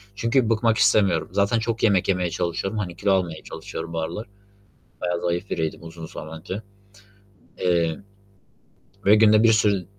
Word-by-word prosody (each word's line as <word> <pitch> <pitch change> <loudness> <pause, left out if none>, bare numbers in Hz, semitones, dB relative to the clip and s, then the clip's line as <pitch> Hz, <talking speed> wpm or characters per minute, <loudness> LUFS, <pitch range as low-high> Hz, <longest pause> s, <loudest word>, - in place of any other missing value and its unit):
çünkü 115 +2 +1
bıkmak 115 0 +2
istemiyorum. 95 -6 +3
Zaten 100 +4 +2
çok 115 0 -3
yemek 100 -5 +3
yemeye 90 -2 +1
çalışıyorum. 90 +5 -2
Hani, 90 -4 -4
kilo 100 +1 0
almaya 90 -5 0
çalışıyorum 85 - -7
bu 80 - -2
aralar. 85 +8 -4 0.7
Bayağı 90 -1 -1
zayıf 85 +3 -2
biriydim, 80 0 -3
uzun 80 0 -9
zaman 80 +1 -9
önce, 95 +6 -6 1.0
eee. 85 -3 +1 1.1
Ve 105 +2 +7
günde 110 0 +5
bir 115 - +6
sürü 100 -4 +2
95 Hz, 150 wpm, -23 LUFS, 85-110 Hz, 1.1 s, Ve